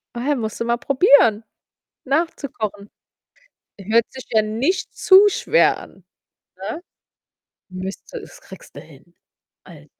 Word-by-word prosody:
Ah 245 Hz, +4 st, -4 dB
ja, 295 Hz, -, +3 dB
musst 220 Hz, -3 st, -5 dB
du 230 Hz, -, -1 dB
mal 235 Hz, 0 st, +1 dB
probieren, 275 Hz, -, +4 dB, 0.6 s
nach 315 Hz, +5 st, +1 dB
zu 280 Hz, -, -7 dB
kochen. 205 Hz, -3 st, -6 dB, 0.9 s
Hört 220 Hz, +4 st, +2 dB
sich 260 Hz, -, -10 dB
ja 220 Hz, -2 st, +3 dB
nicht 250 Hz, -, -2 dB
zu 390 Hz, +2 st, +6 dB
schwer 480 Hz, -, +2 dB
an, 190 Hz, -, -15 dB, 0.5 s
ne? 210 Hz, -, -6 dB, 0.9 s
Müsste 185 Hz, +1 st, -7 dB
es -, -, -14 dB
kriegst -, -, -15 dB
du -, -, -7 dB
hin. -, -, -19 dB, 0.5 s
Also -, -, -15 dB
235 Hz, 140 wpm, -20 LUFS, 215-290 Hz, 0.9 s, zu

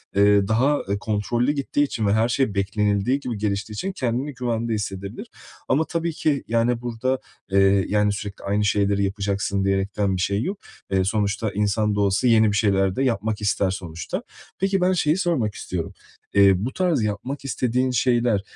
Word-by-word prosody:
eee, 100 Hz, 0 st, +4 dB
daha 130 Hz, +7 st, +2 dB, 0.2 s
kontrollü 115 Hz, +5 st, 0 dB
gittiği 145 Hz, 0 st, 0 dB
için 115 Hz, -6 st, -2 dB
ve 100 Hz, -, +3 dB
her 110 Hz, +2 st, +3 dB
şey 120 Hz, -4 st, 0 dB
beklenildiği 100 Hz, +5 st, +1 dB
gibi 120 Hz, -6 st, -4 dB
geliştiği 105 Hz, 0 st, -2 dB
için 190 Hz, -, -3 dB
kendini 130 Hz, -2 st, -2 dB
güvende 115 Hz, -2 st, -2 dB
hissedebilir. 100 Hz, -2 st, -5 dB, 0.4 s
Ama 150 Hz, +5 st, +2 dB
tabii 170 Hz, 0 st, -2 dB
ki, 150 Hz, -2 st, 0 dB
yani, 115 Hz, +1 st, +1 dB
burada, 125 Hz, +2 st, -1 dB, 0.3 s
eee, 95 Hz, 0 st, +4 dB
yani, 105 Hz, 0 st, +2 dB
sürekli 100 Hz, 0 st, -7 dB
aynı 105 Hz, +1 st, +1 dB
şeyleri 100 Hz, -1 st, +2 dB
yapacaksın 100 Hz, 0 st, -1 dB
diyerekten 100 Hz, 0 st, 0 dB
bir 90 Hz, -, -2 dB
şey 100 Hz, +2 st, 0 dB
yok. 195 Hz, +2 st, -3 dB, 0.3 s
Eee, 95 Hz, -1 st, +2 dB
sonuçta 105 Hz, +1 st, 0 dB
insan 105 Hz, +1 st, 0 dB
da 105 Hz, -, +1 dB
olsa 100 Hz, +5 st, +2 dB
yeni 110 Hz, -2 st, +5 dB
bir 100 Hz, -, -2 dB
şeyler 95 Hz, -3 st, +2 dB
de 135 Hz, -, 0 dB
yapmak 110 Hz, -4 st, -1 dB
ister 100 Hz, -1 st, +1 dB
sonuçta. 85 Hz, -4 st, -5 dB, 0.4 s
Peki, 195 Hz, 0 st, +1 dB
ben 185 Hz, +1 st, +3 dB
şeyi 155 Hz, -2 st, +2 dB
sormak 160 Hz, -, 0 dB
istiyorum. 85 Hz, -3 st, -5 dB, 0.4 s
Eee, 100 Hz, -1 st, +6 dB
bu 130 Hz, -, -4 dB
tarz 175 Hz, -8 st, +1 dB
yapmak 110 Hz, +7 st, -4 dB
istediğin 125 Hz, -1 st, 0 dB
şeyler, 120 Hz, -3 st, +2 dB
105 Hz, 170 wpm, -23 LUFS, 100-125 Hz, 0.4 s, Eee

